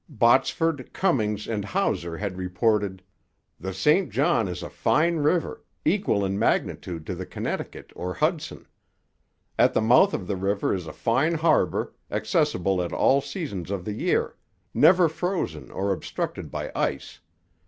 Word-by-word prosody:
Botsford, 135 +3 +2
Cummings, 105 - 0
and 105 -3 -2
Hauser 85 -4 -1
had 100 -1 -3
reported: 95 +1 0 0.6
'The 95 +2 -4
St 150 - +2
John - - +2
is - - -5
a - - -6
fine 165 +2 +2
river, 155 +2 0 0.2
equal 160 - +2
in 95 +1 -2
magnitude 85 -6 -1
to 95 - -4
the 90 +1 -6
Connecticut - - -5
or 90 0 -4
Hudson. 155 0 -1 0.9
At - - +4
the - - +3
mouth 125 - +5
of 95 - -4
the 100 - -2
river 100 +2 0
is 90 -4 -4
a - - -5
fine 155 - +1
harbour, 155 - +1 0.2
accessible 90 +1 0
at 85 - -3
all 140 +1 +3
seasons 120 - -5
of 100 -3 -3
the 105 - -3
year - - 0 0.4
never 180 -1 +6
frozen 160 - -3
or 100 +1 -2
obstructed - - -4
by - - -5
ice... - - -2
105 Hz, 150 wpm, -25 LUFS, 95-155 Hz, 0.9 s, never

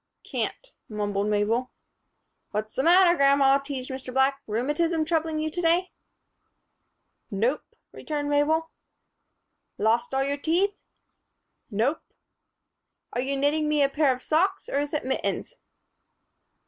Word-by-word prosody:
"Can't," - - -4 0.2
mumbled 205 -1 -2
Mabel. 215 +4 +1 0.8
"What's 215 +1 -4
the - - +1
matter, 350 +3 +6
grandma?" 275 -1 +4
teased 275 -2 -6
Mr. 260 -1 -6
Black. 265 +1 +2
"Rheumatism 295 +9 0
troubling 320 -1 0
you 310 0 -2
to 350 - -3
day?" 345 +2 +2 1.4
"Nope," 235 +7 0 0.3
returned 295 -2 -4
Mabel. 310 +3 +1 1.1
"Lost 225 +3 +1
all 270 - +2
your 280 +1 -1
teeth?" 350 +7 +1 1.0
"Nope." 240 +8 0 1.1
"Are 245 - 0
you 275 +2 -2
knitting 300 +2 +1
me 300 -1 +3
a 275 - +3
pair 290 -1 +2
of 255 0 -4
socks 380 +5 +1
or 280 - -1
is 290 0 -2
it 300 - -2
mittens?" 265 - -2
280 Hz, 125 wpm, -26 LUFS, 255-315 Hz, 1.4 s, matter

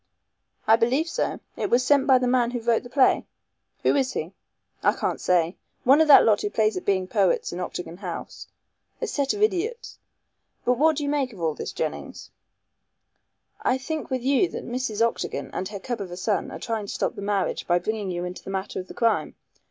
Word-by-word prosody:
"I 220 - +6
believe 255 +8 +1
so. - - -2
It - - -2
was 250 +1 +3
sent 280 0 +4
by 265 -2 +7
the 250 - 0
man 245 -1 +3
who 245 0 -3
wrote 230 0 +2
the 245 - -11
play." 260 0 +3 0.6
"Who - - +3
is 265 -2 +1
he?" 165 +5 -4 0.5
"I - - +4
can't - - -2
say. 175 -1 +2 0.3
One 275 +5 +6
of 320 - +4
that 290 - +9
lot 215 -2 +4
who 205 - -1
play 215 0 +2
at 185 - -4
being 190 -2 +1
poets 190 -3 +1
in 175 - -5
Octagon 180 -1 -5
House. 180 -3 -7 0.5
A 485 - -1
set 285 - 0
of 415 - 0
idiots. 435 +4 -1 0.7
But 250 0 +2
what 315 +1 +4
do 300 - -1
you 285 - -1
make 280 -4 0
of 195 - -12
all 160 -2 0
this, - - -5
Jennings?" - - -5 1.3
"I 255 - +2
think 310 +3 -4
with 260 -2 -2
you 280 +7 +3
that - - -6
Mrs. 230 -2 +1
Octagon - - -5
and 185 - -3
her 205 0 -7
cub 240 +1 -4
of 190 - -5
a 175 - -7
son 200 +2 -1
are - - -7
trying 225 -4 -3
to - - -5
stop - - -1
the - - -8
marriage 200 -1 -1
by 175 - +4
bringing 205 +2 -2
you 175 0 -3
into 180 +1 -7
the - - -8
matter 190 0 -3
of 185 - -7
the - - -11
crime. 230 -2 +1
230 Hz, 220 wpm, -25 LUFS, 190-265 Hz, 1.3 s, that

